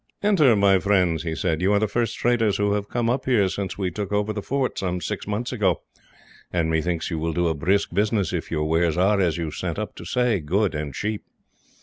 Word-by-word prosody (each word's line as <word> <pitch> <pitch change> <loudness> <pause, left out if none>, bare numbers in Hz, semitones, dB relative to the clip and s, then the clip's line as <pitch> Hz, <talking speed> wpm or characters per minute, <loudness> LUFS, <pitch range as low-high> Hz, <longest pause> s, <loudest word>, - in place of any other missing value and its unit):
"Enter, 160 - +5
my 100 -2 +4
friends," 90 -5 +2
he 80 -2 -3
said. 80 -1 -1
"You 95 +3 +3
are 100 - +4
the 110 - +1
first 115 +2 -1
traders 115 -4 +2
who 105 0 +1
have 100 -1 -2
come 120 -1 -1
up 125 +3 0
here 115 -7 +3
since 95 0 -4
we 95 -3 -1
took 100 +2 -5
over 105 +1 0
the 105 - -4
fort, 135 +3 -1
some 90 -2 -2
six - - -4
months 105 +4 -2
ago, 100 -8 0 0.7
and 80 -2 0
methinks 80 +2 -1
you 80 - -2
will 80 +1 -2
do 85 +1 +1
a 80 - +1
brisk 95 +7 0
business 100 -2 +1
if 85 - -3
your 75 -1 -1
wares 80 +1 +1
are, 100 +2 +3
as 85 -3 +1
you 80 -2 -3
sent 85 +1 -4
up 105 -2 -4
to - - -8
say, 125 +1 +1
good 95 +6 0
and 75 -3 -4
cheap." 105 0 -3
100 Hz, 235 wpm, -24 LUFS, 85-105 Hz, 0.7 s, Enter